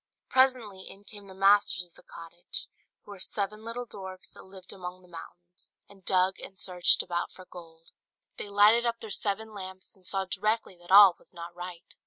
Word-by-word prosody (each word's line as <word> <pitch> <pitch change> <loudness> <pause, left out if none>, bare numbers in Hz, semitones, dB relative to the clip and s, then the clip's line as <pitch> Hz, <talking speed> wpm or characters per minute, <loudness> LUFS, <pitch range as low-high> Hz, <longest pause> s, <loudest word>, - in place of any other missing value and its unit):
Presently 250 -7 +2
in 200 - -12
came 205 -1 -10
the 190 - -12
masters 195 -1 +4
of 170 - -18
the - - -17
cottage, 170 +1 -8 0.4
who - - -13
were 200 - -10
seven 210 +3 -2
little 235 +2 -5
dwarfs 190 -4 -8
that - - -11
lived 190 -1 -7
among 185 -1 -8
the - - -19
mountains, 175 +1 -12
and 195 -2 -17
dug 185 +1 +3
and 190 - -9
searched 180 -2 +4
about 175 0 -3
for 185 - -14
gold. 165 -2 -13 0.5
They 205 - -4
lighted 210 +4 +5
up 235 0 -1
their 220 - -8
seven 215 +2 -2
lamps, 190 -2 -9
and 190 - -26
saw 190 +1 -1
directly 205 +2 -1
that 175 - -16
all 195 -1 +9
was - - -20
not 170 0 -8
right. 175 -1 -9
190 Hz, 195 wpm, -28 LUFS, 180-205 Hz, 0.5 s, all